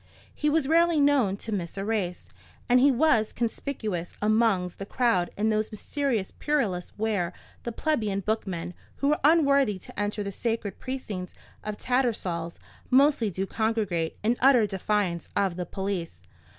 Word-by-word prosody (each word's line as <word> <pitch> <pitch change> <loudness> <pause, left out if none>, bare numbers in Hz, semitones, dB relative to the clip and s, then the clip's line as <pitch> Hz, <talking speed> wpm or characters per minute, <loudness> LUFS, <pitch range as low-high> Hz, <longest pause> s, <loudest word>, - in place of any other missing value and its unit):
He 300 - 0
was 300 -2 +2
rarely 335 0 +4
known 275 -9 +3
to 220 - -6
miss 185 -3 -3
a 195 - -2
race; 200 -5 -2 0.4
and 250 +1 +5
he 275 +3 +6
was 245 -5 +3
conspicuous 220 - -3
amongst 210 -4 +1
the 195 - -4
crowd 205 -9 +1
in 215 +2 +1
those 215 0 0
mysterious 230 -1 -2
purlieus 220 -13 -1
where 205 -5 -1 0.3
the 235 - -4
plebeian 220 -8 -1
bookmen, 185 -5 -3 0.2
who 280 +1 +1
are - - -2
unworthy 280 - +4
to 185 - -10
enter 205 0 -1
the 200 - -4
sacred 225 0 -3
precincts 215 -9 -5 0.3
of 210 -1 -4
Tattersall's, 210 -11 -1 0.3
mostly 265 -4 +4
do 190 +1 -2
congregate, 205 -7 -1
in 235 +3 +2
utter 255 -4 +6
defiance 195 -3 -1
of 195 -3 +1
the 180 0 -4
police. 180 - -4
215 Hz, 150 wpm, -27 LUFS, 190-255 Hz, 0.4 s, he